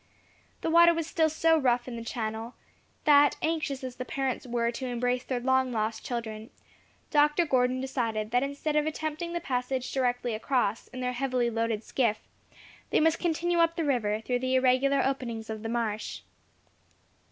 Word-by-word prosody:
The 325 - -1
water 340 0 +7
was 330 -1 -1
still 320 0 +1
so 320 +1 +3
rough 245 -3 +1
in 245 - -5
the 230 - -6
channel, 225 0 -4 0.5
that, 290 -1 +5
anxious 310 -4 -1
as 255 -1 -6
the 255 - -3
parents 265 +1 -3
were 235 -1 0
to 260 +2 -5
embrace 245 +1 -1
their 255 -1 -2
long 260 +1 +2
lost 220 -1 -2
children, 225 -2 -5 0.6
Dr. 295 +3 +4
Gordon 255 -3 +2
decided 230 -5 -2
that 245 +1 +3
instead 280 +2 -2
of 300 0 +2
attempting 315 +2 -3
the 345 - -1
passage 255 -3 -2
directly 245 -2 0
across, 225 -1 -1
in 255 0 -8
their 250 0 -1
heavily 250 -2 0
loaded 225 -1 -1
skiff, 230 -4 0 0.7
they - - +3
must 320 +1 +3
continue 345 0 0
up 335 0 +3
the 330 - -1
river, 220 -6 0
through 245 +2 -1
the 260 +1 0
irregular 260 +2 +3
openings 235 -5 -3
of 220 -1 -5
the 225 - -4
marsh. 225 -2 -2
255 Hz, 175 wpm, -28 LUFS, 235-290 Hz, 0.7 s, water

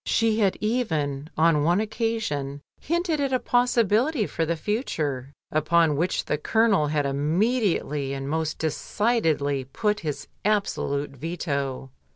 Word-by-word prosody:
She 225 -1 +2
had 195 -3 +2
even 160 - -1
on 160 -1 +4
one 175 +5 +3
occasion 210 - -2 0.2
hinted 340 -1 0
at 275 -1 0
a 255 - +3
possibility 245 +1 +2
for 165 -3 -2
the 170 - +1
future, 155 - -2 0.2
upon 155 0 +3
which 170 +6 0
the 150 - -1
Colonel 215 -4 +3
had 145 -1 0
immediately 150 - 0
and 135 0 -4
most 160 +1 -1
decidedly 160 - 0
put 210 - -1
his 150 -3 -4 0.2
absolute 195 -9 0
veto. 140 -3 -3
165 Hz, 130 wpm, -25 LUFS, 145-220 Hz, 0.2 s, on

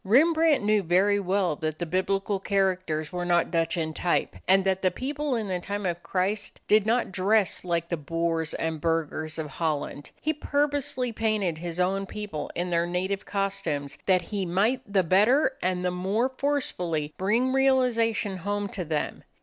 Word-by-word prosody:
Rembrandt 310 - +4
knew 210 0 +3
very 195 +4 +3
well 190 -3 +1
that 155 -1 -3
the 175 - -3
Biblical 195 +3 0
characters 185 -6 0
were 180 0 -2
not 175 -1 +2
Dutch 165 0 +1
in 160 -1 -2
type, 175 +2 0
and 190 +1 +4
that 190 0 +1
the 185 - +3
people 280 +7 -2
in 220 -3 -2
the 185 -2 -1
time 200 +2 -4
of 175 -1 -2
Christ 195 +4 -2
did 215 0 +4
not 235 -2 +1
dress 195 +2 +2
like 170 -2 -1
the 170 - -1
boors 165 +1 -1
and 160 -2 -2
burghers 155 -1 -1
of 160 - -3
Holland. 145 -1 -3
He 310 - 0
purposely 285 -4 0
painted 215 -7 0
his 170 0 -5
own 195 +2 +1
people 205 -8 -5
in 175 +1 -2
their 170 0 +2
native 185 +3 -2
costumes, 170 -8 -2
that 185 -2 +4
he 200 +2 -3
might 200 +9 +1
the 195 -2 +3
better 225 - +4
and 180 0 0
the 180 - +1
more 195 +8 0
forcefully 180 - -2
bring 230 +7 +2
realization 240 -7 +2
home 205 +2 -2
to 190 - -4
them. 155 -2 -3
190 Hz, 175 wpm, -27 LUFS, 170-215 Hz, -, Rembrandt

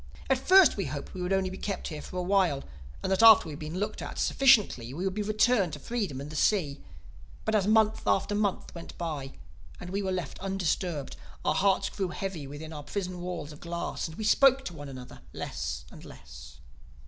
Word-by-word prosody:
At 265 - +3
first 370 - +6
we 195 - -1
had 140 - -5
hoped 145 - -6
we 185 - -6
would 180 +1 -2
only 190 -1 +1
be 190 - -8
kept 200 -3 -3
here 155 -3 -6
for 185 - -8
a 180 - -1
while, 185 -7 +2 0.4
and - - -1
that 190 - +2
after 225 -4 +9
we 160 - -6
had 145 - -8
been 155 +2 -5
looked 210 +2 -3
at - - -6
sufficiently 200 - +3
we 180 +4 -3
would 190 - 0
be 210 - -2
returned 215 -3 +2
to 145 - -6
freedom 200 - -3
and 140 +2 -7
the - - -8
sea. 150 -6 +1 0.6
But 220 - 0
as 205 -2 +2
month 220 0 +3
after 200 +1 +2
month 205 -2 -1
went 170 -1 -10
by, 150 -6 -4 0.5
and 180 - -8
we 200 +1 -1
were 190 -1 -2
left 180 -7 -4
undisturbed, 180 -5 -2 0.3
our 150 - +3
hearts 195 +4 +2
grew 195 -2 -2
heavy 175 -5 -5
within 155 +3 -8
our 150 - -6
prison 180 +3 -4
walls 175 -4 -5
of 150 - -12
glass 170 0 -4
and 160 - -11
we 220 - -4
spoke 270 +4 +5
to 175 - -5
one 145 -3 -8
another 130 -2 -10
less - - -5
and - - -12
less. 70 -3 -12
180 Hz, 220 wpm, -28 LUFS, 150-205 Hz, 0.6 s, after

